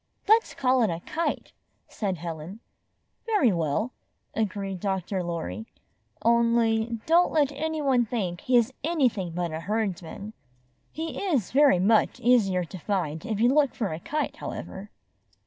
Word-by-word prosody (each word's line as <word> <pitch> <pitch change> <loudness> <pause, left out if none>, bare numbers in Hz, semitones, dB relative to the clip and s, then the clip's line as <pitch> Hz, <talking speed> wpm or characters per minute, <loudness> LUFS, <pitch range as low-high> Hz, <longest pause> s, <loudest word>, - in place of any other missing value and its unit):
''Let's 445 +2 +4
call 255 -1 +2
it 220 - +3
a 165 - -2
kite/' 330 - -3 0.4
said 195 -4 -3
Helen. 165 +4 -7 0.7
''Very 295 - +3
well," 170 - -1 0.4
agreed 195 -3 -2
Dr. 190 -1 -2
Lorry, 110 - -4 0.6
"only 230 -1 +2
don't 340 +2 +4
let 295 -3 +2
any 310 +2 -3
one 255 -4 +3
think 190 -7 -3
he 250 -1 +3
is 240 +2 +2
anything 260 - +1
but 175 -1 -2
a 160 - -4
Herds 205 0 -1
man. 200 +5 -8 0.6
He 320 +4 -5
is 290 - 0
very 280 -5 +5
much 210 +5 +3
easier 205 -7 +3
to 180 +2 -9
find 170 -1 -2
if 215 -3 -2
you 240 +3 +4
look 290 -3 +3
for 205 -8 -2
a 155 - -5
kite, 300 - -3
however." 195 +2 -7
220 Hz, 150 wpm, -26 LUFS, 180-260 Hz, 0.7 s, very